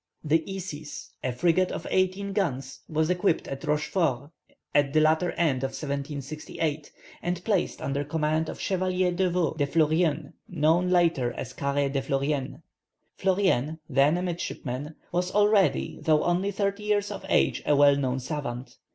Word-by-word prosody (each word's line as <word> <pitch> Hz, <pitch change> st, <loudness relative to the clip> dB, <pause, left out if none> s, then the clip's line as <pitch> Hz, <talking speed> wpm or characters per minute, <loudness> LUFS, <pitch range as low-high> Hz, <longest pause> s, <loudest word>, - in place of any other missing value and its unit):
The 160 Hz, +1 st, +2 dB
Isis, 155 Hz, -6 st, -7 dB
a 130 Hz, -, 0 dB
frigate 175 Hz, +8 st, +2 dB
of -, -, -5 dB
eighteen 190 Hz, +1 st, 0 dB
guns, 135 Hz, -10 st, -2 dB
was 160 Hz, +2 st, +1 dB
equipped 180 Hz, -1 st, +1 dB
at 135 Hz, 0 st, -6 dB
Rochefort 150 Hz, -2 st, 0 dB, 0.4 s
at 145 Hz, -1 st, +3 dB
the 155 Hz, -, +5 dB
latter 160 Hz, +3 st, +3 dB
end 160 Hz, -6 st, +1 dB
of 135 Hz, +1 st, -3 dB
1768, 145 Hz, +1 st, -4 dB, 0.3 s
and 175 Hz, 0 st, -2 dB
placed 205 Hz, -5 st, 0 dB
under 140 Hz, +1 st, -1 dB
command 155 Hz, +1 st, 0 dB
of -, -, -7 dB
Chevalier 185 Hz, -1 st, 0 dB
d'Eveux 175 Hz, -3 st, 0 dB
de 145 Hz, -2 st, +1 dB
Fleurien, 155 Hz, -1 st, +1 dB, 0.2 s
known 170 Hz, +1 st, +2 dB
later 170 Hz, -9 st, +2 dB
as 120 Hz, -, -6 dB
Caret 140 Hz, 0 st, -1 dB
de 135 Hz, -, +1 dB
Fleurien. 135 Hz, 0 st, -2 dB, 0.6 s
Fleurien, 185 Hz, -7 st, +1 dB
then 140 Hz, +3 st, +3 dB
a 180 Hz, -, -2 dB
midshipman, 150 Hz, -5 st, -4 dB, 0.2 s
was 180 Hz, +1 st, 0 dB
already, 205 Hz, -2 st, +3 dB
though 155 Hz, -1 st, +3 dB
only 180 Hz, +3 st, +1 dB
thirty 200 Hz, +1 st, -1 dB
years 210 Hz, -1 st, 0 dB
of 205 Hz, -, -6 dB
age, -, -, +2 dB
a 145 Hz, -, +5 dB
well 145 Hz, 0 st, +6 dB
known 130 Hz, -2 st, -1 dB
savant. 125 Hz, -3 st, -5 dB
155 Hz, 150 wpm, -27 LUFS, 140-180 Hz, 0.6 s, well